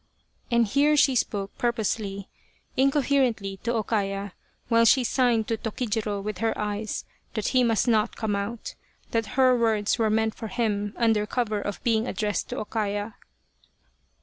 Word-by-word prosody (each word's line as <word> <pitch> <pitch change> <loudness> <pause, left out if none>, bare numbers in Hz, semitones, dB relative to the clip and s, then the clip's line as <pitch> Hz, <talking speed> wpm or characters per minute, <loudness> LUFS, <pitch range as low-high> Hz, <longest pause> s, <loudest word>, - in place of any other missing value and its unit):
and 235 -1 +3
here 285 +7 +3
she 280 -2 +5
spoke, 205 -5 -1
purposely, 215 -4 -1 0.5
incoherently 260 -7 +1
to 230 +5 -3
O 225 -2 0
Kaya, 195 -2 -2 0.3
while 230 -1 +4
she 250 +3 +5
signed 240 -3 +2
to 225 - -1
Tokijiro 215 -2 -2
with 210 -3 -4
her 225 0 0
eyes 210 0 -3 0.3
that 215 - -1
he 255 -1 +3
must 230 0 +2
not 220 -1 +2
come 215 -3 -1
out 205 +3 -4 0.4
that 225 +1 -2
her 255 -1 +5
words 225 -2 +1
were 220 -1 +3
meant 220 0 +1
for 225 - -7
him 205 -1 -1
under 220 -3 +2
cover 215 -4 -1
of 205 0 -5
being 225 0 +1
addressed 210 -5 -2
to - - -4
O - - -3
Kaya. 205 0 -2
220 Hz, 160 wpm, -26 LUFS, 205-235 Hz, 0.5 s, she